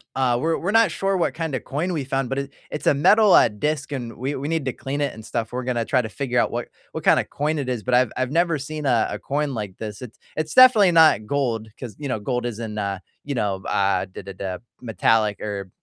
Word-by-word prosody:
uh, 125 -2 +2
we're 165 +3 0
we're 190 +4 -2
not 225 -3 +5
sure 195 +3 -1
what 175 - 0
kinda 160 -6 -3
coin 155 +10 -3
we 150 -6 -2
found, 135 -1 -1
but 135 +1 -1
it 140 0 -6 0.2
it's 150 - -4
a - - +6
metal, 200 +7 +5
uh, - - +7
disc, 145 +7 -2
and 120 -4 -5
we 135 +4 -3
we 140 +2 -4
need 165 -3 -1
to 130 - -1
clean 140 +4 -4
it 140 -2 -1
and 110 0 -11
stuff. 115 -2 -3
We're 125 +1 -3
gonna 120 -2 0
try 130 +2 +1
to 115 - -5
figure 125 +1 -1
out - - +2
what 120 0 -4 0.2
what - - -5
kind - - +5
of - - -3
coin 150 +1 -1
it 135 - -3
is, 125 -4 -2
but 125 - -2
I've 125 -2 +4
I've 130 0 -1
never 170 +1 +2
seen 150 +2 -6
a 120 -5 +3
a 105 - -4
coin 140 +5 -2
like 105 -5 -5
this. 105 0 -7
It's 125 -3 -10 0.2
it's 155 0 -2
definitely 235 -8 +7
not 160 -10 +5
gold, 115 -4 -1
'cause, 115 -6 -8
you 145 - -4
know, 125 -5 -2
gold 125 +3 -2
isn't, 115 -2 -5
uh, 100 -2 -2 0.3
you 140 - -3
know, 105 -5 0
uh, 100 0 +1
da, 95 - -10
da, 100 +1 -8
da, 95 -1 -5 0.2
metallic 110 -2 +1
or, 100 -2 -4
130 Hz, 260 wpm, -23 LUFS, 110-150 Hz, 0.3 s, uh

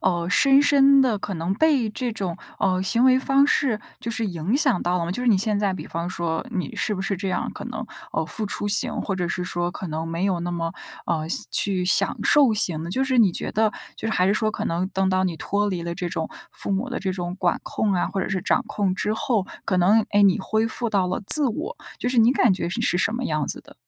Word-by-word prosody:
呃， 175 -2 0
深 275 +6 +5
深 275 -1 +5
地 235 -6 +1
可 200 -1 -5
能 165 +3 -2
被 280 -2 +2
这 240 +1 -3
种， 185 -6 -4 0.2
呃， 185 -1 +1
行 230 +6 +2
为 260 0 +5
方 275 +1 +3
式， 255 -7 +1 0.2
就 230 - -5
是 230 0 -2
影 185 - -1
响 270 - +2
到 180 +1 0
了 170 - -2
吗？ 170 - -4
就 245 - -4
是 250 - +1
你 210 - +5
现 210 +1 0
在 200 -2 0
比 - - -7
方 170 +1 -4
说， 170 +3 -3
你 180 - -4
是 210 - -1
不 190 - -5
是 195 0 -2
这 195 +1 -4
样 185 - -2
可 - - -8
能， - - -6 0.3
呃， - - -1
付 220 - -3
出 205 0 -3
型， 205 - +3
或 195 - -3
者 180 -1 -2
是 180 - -3
说 175 0 -2
可 185 0 -7
能 160 +1 -4
没 165 +3 -3
有 185 -3 0
那 175 - -3
么， 165 -1 -3 0.3
呃， 160 -2 -1 0.2
去 190 -3 0
享 180 - +2
受 280 -5 +4
型 170 -6 0
的。 170 - -6
就 260 - 0
是 260 -2 0
你 205 -6 +5
觉 - - -3
得 220 0 +2 0.3
就 225 - -5
是 220 - -1
还 180 - +2
是 200 - +2
说， 215 0 +1
可 - - -5
能 170 +2 -1
等 190 -1 0
到 185 0 +1
你 175 -3 -2
脱 205 +5 -1
离 180 -3 -3
了 170 0 -4
这 175 0 -4
种 160 -1 -4 0.2
父 - - -6
母 200 +7 -1
的 250 - -3
这 190 -1 -2
种 175 -1 -4
管 175 -2 +1
控 210 -2 -1
啊， 175 - 0
或 195 - -3
者 - - -3
是 190 -2 -2
掌 - - +1
控 195 -3 -1
之 210 +2 -1
后， 225 -6 -1 0.2
可 185 - 0
能， 205 +5 +4
诶， 205 0 +3
你 195 -1 +4
恢 220 +3 0
复 235 +1 -2
到 195 -3 +1
了 180 - -3
自 300 +4 +10
我， 320 - -5 0.2
就 - - -2
是 250 -1 0
你 230 +2 +5
感 245 -5 +3
觉 180 - -4
你 190 +7 -3
是 175 - +1
什 210 - 0
么 250 +2 -3
样 155 - -1
子 - - -4
的？ - - -18
195 Hz, 285 characters per minute, -23 LUFS, 180-230 Hz, 0.3 s, 自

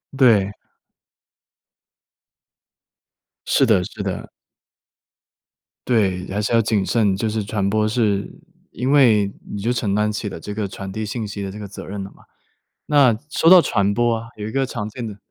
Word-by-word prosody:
对。 110 -7 +4 3.0
是 - - +4
的 105 -5 +4
是 105 -1 -7
的。 95 -2 -4 1.6
对， 95 -6 +1
还 100 +2 -2
是 105 - -2
要 115 - +4
谨 105 -3 0
慎， 105 -5 +2
就 110 +3 -1
是 110 0 -2
传 100 -2 -1
播 110 +1 +1
是 105 -3 0 0.4
因 125 +4 -2
为 110 -8 +4 0.2
你 100 - -5
就 115 +4 0
承 105 -5 -1
担 105 0 +1
起 105 0 -4
了 95 - -6
这 105 +5 -7
个 105 -1 -2
传 95 0 -7
递 110 +2 -4
信 110 +2 -4
息 100 0 -6
的 100 - -4
这 100 - -8
个 105 - -7
责 100 - -9
任 100 0 -5
了 95 - -9
嘛。 - - -21 0.6
那 135 -7 +4
说 165 - +3
到 185 -1 +9
传 100 -8 +1
播 120 0 +1
啊 115 - -8
有 105 -1 -6
一 110 - -5
个 135 +1 0
常 110 -4 -5
见 115 +1 -6
的 105 -1 -8
105 Hz, 190 characters per minute, -21 LUFS, 100-115 Hz, 3.0 s, 到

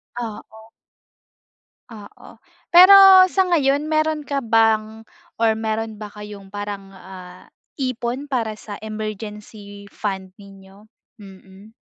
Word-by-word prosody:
Oo. 220 -1 -9 1.2
Oo. 210 -3 -14 0.4
Pero 380 +1 +8
sa 385 - +2
ngayon, 290 -3 +1
meron 310 -1 -1
ka 275 -2 -3
bang 220 -1 0 0.3
or 225 -1 +2
meron 220 0 -4
ba 210 -1 -10
kayong 205 -2 -12
parang 205 -1 -7
ah, 185 -1 -13 0.3
ipon 255 +1 -4
para 225 -6 -3
sa 205 - -9
emergency 210 -1 -8
fund 190 -3 -6
ninyo? 195 0 -17 0.4
Mm. 195 +1 -16
215 Hz, 105 wpm, -20 LUFS, 200-245 Hz, 1.2 s, Pero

